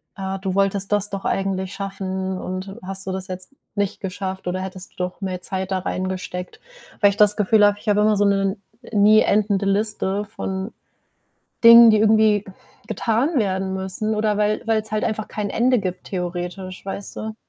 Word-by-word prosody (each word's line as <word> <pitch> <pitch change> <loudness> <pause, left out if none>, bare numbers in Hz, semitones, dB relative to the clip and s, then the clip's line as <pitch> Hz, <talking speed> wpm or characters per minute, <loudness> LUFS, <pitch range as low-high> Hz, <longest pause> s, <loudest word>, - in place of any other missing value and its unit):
äh, 195 -1 -4
„Du 190 -1 -2
wolltest 195 0 0
das 205 0 +1
doch 195 -1 -6
eigentlich 190 -1 -1
schaffen 190 -1 -4
und 185 +3 -6
hast 195 +1 -6
du - - -1
das 190 0 -5
jetzt 185 +2 -6 0.2
nicht 205 -3 -2
geschafft 190 -1 -5
oder 185 +1 -2
hättest 190 0 -7
du - - -30
doch 180 +1 -4
mehr 185 -2 -4
Zeit 190 +1 -3
da 190 - +1
reingesteckt.” 185 -1 -4 0.4
Weil 205 - +7
ich 200 - -4
das 210 -1 +5
Gefühl 210 0 +4
habe, 205 0 +3
ich 215 - -4
habe 205 0 +3
immer 215 0 +4
so 205 0 +2
'ne 195 0 +1 0.3
nie 215 0 +5
endende 205 -1 +1
Liste 205 0 0
von 195 -1 -5 0.9
Dingen, 230 0 +10
die 215 - +4
irgendwie 215 -1 +4 0.4
getan 245 +8 0
werden 190 -3 -1
müssen, 190 +3 -2
oder 215 -1 0
weil 210 0 +1
weil 220 -1 +2
es 215 - -9
halt 215 - 0
einfach 215 -1 -2
kein 210 -1 -3
Ende 245 +4 +2
gibt 185 -3 -4
theoretisch, 180 +1 -5
weißt 195 0 -6
du? 220 0 -5
195 Hz, 185 wpm, -22 LUFS, 190-210 Hz, 0.9 s, Dingen